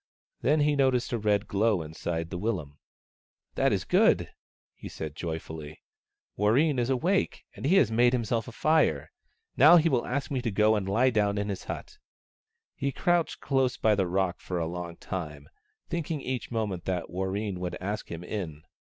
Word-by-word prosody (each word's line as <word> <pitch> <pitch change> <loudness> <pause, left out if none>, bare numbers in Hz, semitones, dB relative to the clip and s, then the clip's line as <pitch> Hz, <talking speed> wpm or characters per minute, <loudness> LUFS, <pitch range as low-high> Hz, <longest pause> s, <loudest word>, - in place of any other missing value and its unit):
Then 150 +2 +3
he 145 0 +3
noticed 130 -3 +1
a 120 - 0
red 105 0 +1
glow 100 -3 +1
inside 80 +1 -4
the 90 - -4
willum. 85 -10 -3 0.3
" - - -63
That - - +2
is - - 0
good," - - +3 0.4
he - - -10
said, 75 -2 -6
joyfully, 80 -2 -6 0.3
" - - -57
Warreen 130 +7 +3
is 120 +1 0
awake, 170 +10 0
and - - -3
has 185 -7 +4
made 120 +2 +4
himself 115 -2 -1
a - - -7
fire. 150 - +2 0.5
Now 155 +7 +8
he 165 0 +4
will 125 -5 0
ask 140 +3 -2
me 130 -3 0
to 120 - -1
go 105 +1 +3
and 95 -2 -2
lie 125 +6 +3
down 105 -2 +1
in 100 0 -2
his 100 - -5
hut." - - -7 0.7
He 140 +1 -2
crouched 175 +2 0
close 135 -2 +1
by 110 - +3
the 95 -3 +1
rock 90 0 0
for 90 - -4
a 85 - 0
long 85 0 -5
time, 75 -6 -6 0.4
thinking 165 -2 -3
each 130 -3 -4
moment 105 -7 -3
that 90 -3 -2
Warreen 95 +1 -2
would 90 -1 -4
ask 100 +3 -4
him 85 +1 -6
in. 85 -6 -5
105 Hz, 185 wpm, -28 LUFS, 90-130 Hz, 0.7 s, Now